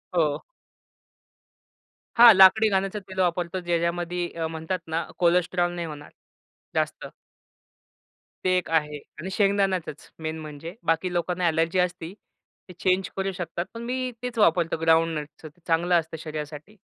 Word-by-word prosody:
हो. 155 Hz, -4 st, +2 dB, 1.8 s
हां, 235 Hz, -1 st, +11 dB
लाकडी 195 Hz, +3 st, +7 dB
घाण्याचं 195 Hz, +1 st, 0 dB
तेल 190 Hz, 0 st, -9 dB
वापरतो. 180 Hz, +1 st, 0 dB
ज्या 175 Hz, -1 st, 0 dB
ज्यामध्ये 175 Hz, +1 st, -2 dB
अ, 160 Hz, -, -1 dB
म्हणतात 160 Hz, +3 st, -3 dB
ना 160 Hz, +1 st, -2 dB
कोलेस्ट्रॉल 175 Hz, 0 st, +2 dB
नाही 170 Hz, -1 st, -4 dB
होणार 150 Hz, -2 st, -9 dB, 0.6 s
जास्त. -, -, -1 dB, 1.4 s
ते 185 Hz, 0 st, +3 dB
एक 180 Hz, -, -4 dB
आहे 150 Hz, -2 st, 0 dB, 0.2 s
आणि 185 Hz, -, -5 dB
शेंगदाण्याचच 195 Hz, -6 st, 0 dB
मेन 160 Hz, 0 st, -3 dB
म्हणजे 155 Hz, +2 st, -8 dB, 0.2 s
बाकी 165 Hz, +3 st, 0 dB
लोकांना 175 Hz, +1 st, -1 dB
अ‍ॅलर्जी 165 Hz, +2 st, +1 dB
असती, 180 Hz, -1 st, -1 dB, 0.6 s
ते -, -, -9 dB
चेंज 185 Hz, 0 st, +1 dB
करू 195 Hz, 0 st, -1 dB
शकतात, 175 Hz, -1 st, -4 dB
पण 230 Hz, -, -6 dB
मी 255 Hz, +1 st, -2 dB
तेच 250 Hz, -2 st, -5 dB
वापरतो 170 Hz, -4 st, +3 dB
ग्राउंडनटचं. 160 Hz, -2 st, +1 dB
ते 170 Hz, +4 st, -26 dB
चांगलं 170 Hz, +1 st, +2 dB
असतं 160 Hz, 0 st, -9 dB
शरीरासाठी. 155 Hz, +5 st, -7 dB
175 Hz, 140 wpm, -25 LUFS, 160-185 Hz, 1.8 s, हां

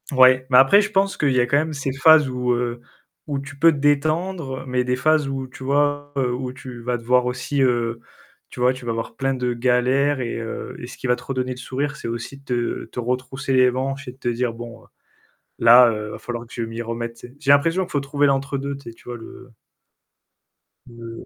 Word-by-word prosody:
Ouais, 130 Hz, -1 st, +5 dB
mais 125 Hz, -, +6 dB
après 135 Hz, +11 st, +7 dB
je 210 Hz, +1 st, -3 dB
pense 195 Hz, -1 st, +1 dB
qu'il 145 Hz, -2 st, +1 dB
y 130 Hz, -, +2 dB
a 120 Hz, -, +4 dB
quand 140 Hz, +3 st, +2 dB
même 155 Hz, +2 st, 0 dB
ces 140 Hz, -2 st, -3 dB
phases 150 Hz, +1 st, +6 dB
où, 125 Hz, -1 st, -1 dB
heu, 120 Hz, 0 st, -2 dB, 0.5 s
où 140 Hz, -2 st, -2 dB
tu 145 Hz, +1 st, -9 dB
peux 165 Hz, +3 st, +6 dB
te 150 Hz, -, -4 dB
détendre 145 Hz, +1 st, 0 dB
mais 125 Hz, 0 st, 0 dB
des 125 Hz, 0 st, -1 dB
phases 150 Hz, +1 st, +2 dB
où, 135 Hz, -1 st, -4 dB
tu 130 Hz, +1 st, -12 dB
vois, 145 Hz, +1 st, 0 dB
heu, 125 Hz, -2 st, +1 dB
où 125 Hz, 0 st, -4 dB
tu 130 Hz, -2 st, -10 dB
vas 120 Hz, +1 st, -1 dB
devoir 125 Hz, +2 st, +2 dB
aussi, 125 Hz, +3 st, -2 dB
heu, 120 Hz, -2 st, +1 dB, 0.5 s
tu -, -, -11 dB
vois, 125 Hz, +1 st, +3 dB
tu 130 Hz, -, -11 dB
vas 120 Hz, -, -2 dB
avoir 115 Hz, 0 st, -4 dB
plein 135 Hz, +2 st, 0 dB
de 125 Hz, -1 st, -1 dB
galères 130 Hz, +4 st, +2 dB
et 120 Hz, -2 st, -3 dB
heu, 115 Hz, -1 st, -6 dB
et 120 Hz, -, -7 dB
ce 125 Hz, -, -11 dB
qui -, -, -5 dB
va 125 Hz, -, +3 dB
te -, -, -13 dB
redonner 130 Hz, -1 st, -3 dB
le 125 Hz, -, -5 dB
sourire, 135 Hz, +3 st, -3 dB
c'est 135 Hz, -, -6 dB
aussi 115 Hz, +4 st, -6 dB
de -, -, -23 dB
te 120 Hz, -2 st, -2 dB
te -, -, -6 dB
retrousser 125 Hz, +2 st, -2 dB
les 130 Hz, -1 st, +5 dB
manches 135 Hz, +2 st, -3 dB
et -, -, -6 dB
de 130 Hz, -, -21 dB
te 130 Hz, -, -6 dB
dire: 120 Hz, 0 st, 0 dB
«Bon, 115 Hz, 0 st, -10 dB
heu, -, -, -22 dB, 0.7 s
là, 120 Hz, +1 st, +8 dB
heu, 105 Hz, -1 st, -5 dB
va -, -, -7 dB
falloir 120 Hz, -1 st, -6 dB
que -, -, -17 dB
je 120 Hz, -, -3 dB
m'y 115 Hz, +1 st, -4 dB
remette», 115 Hz, 0 st, -5 dB
tu -, -, -10 dB
sais? 125 Hz, -, -20 dB
J'ai 145 Hz, -1 st, +3 dB
l'impression 165 Hz, +6 st, +3 dB
qu'il -, -, -12 dB
faut 145 Hz, -, +1 dB
trouver 145 Hz, +1 st, +1 dB
l'entre 140 Hz, 0 st, 0 dB
deux, 140 Hz, +1 st, -4 dB
tu 140 Hz, -4 st, -10 dB
sais, -, -, -14 dB
tu -, -, -21 dB
vois, 120 Hz, -, -5 dB
le 120 Hz, +2 st, -12 dB, 1.4 s
le 115 Hz, -1 st, -10 dB
130 Hz, 245 wpm, -22 LUFS, 120-140 Hz, 1.4 s, là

